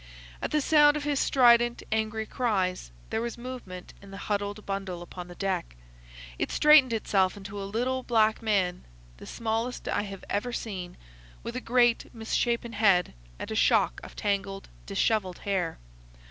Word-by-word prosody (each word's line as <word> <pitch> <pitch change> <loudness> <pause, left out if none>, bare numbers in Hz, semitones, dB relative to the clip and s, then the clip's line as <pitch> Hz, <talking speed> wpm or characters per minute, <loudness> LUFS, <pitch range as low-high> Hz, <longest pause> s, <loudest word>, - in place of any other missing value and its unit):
At - - -2
the 305 - +1
sound 295 0 +5
of 295 - -4
his 290 -1 0
strident, 240 -2 +4
angry 220 0 -1
cries 190 - -1 0.2
there 220 - 0
was 235 0 -4
movement 235 -8 -8
in 200 - -13
the 195 - -9
huddled 205 +1 -3
bundle 195 -3 -4
upon 180 0 -9
the 175 - -11
deck. 190 - -2 0.6
It - - -1
straightened 300 -4 +6
itself 200 -3 +1
into 200 +1 -7
a 195 - -5
little 250 +5 -1
black 220 -3 +2
man—the 175 - -3
smallest 230 +2 -3
I - - 0
have 195 -2 -8
ever 210 +5 -2
seen—with 175 - -8
a 255 - -3
great, 240 -1 +2
misshapen 235 +1 -1
head 195 -5 +3 0.2
and - - -6
a - - -2
shock - - +3
of - - -11
tangled, 200 -1 -2 0.2
dishevelled 195 -2 0
hair. 185 -5 -2
210 Hz, 155 wpm, -28 LUFS, 190-235 Hz, 0.6 s, straightened